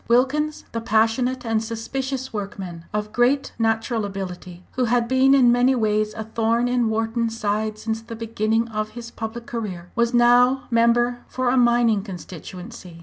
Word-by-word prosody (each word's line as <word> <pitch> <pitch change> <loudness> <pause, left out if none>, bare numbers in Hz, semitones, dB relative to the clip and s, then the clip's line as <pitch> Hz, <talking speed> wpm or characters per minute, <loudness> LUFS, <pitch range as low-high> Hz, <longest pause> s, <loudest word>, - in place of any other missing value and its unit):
Wilkins, 285 +6 +1
the 230 - -3
passionate 230 +3 +1
and 225 -1 0
suspicious 260 +4 -4
workman, 195 -5 -6
of 210 0 -3
great 255 +3 +2
natural 225 0 0
ability, 185 -3 -6
who 255 - 0
had 240 0 +1
been 260 +2 +4
in 250 -3 +6
many 250 +2 +3
ways 215 -2 0
a 220 - -4
thorn 230 +2 0
in 245 -2 +1
Wharton's 225 +1 -1
side 215 0 -1
since 220 +1 -3
the 230 0 -8
beginning 225 0 0
of 215 -1 -3
his 235 0 -7
public 230 +1 -6
career, 190 -8 -5
was 235 0 +2
now 245 +2 +4
member 240 +1 +3
for 255 -1 -1
a 250 - +2
mining 240 -3 +3
constituency. 180 0 -9
230 Hz, 160 wpm, -23 LUFS, 215-245 Hz, -, in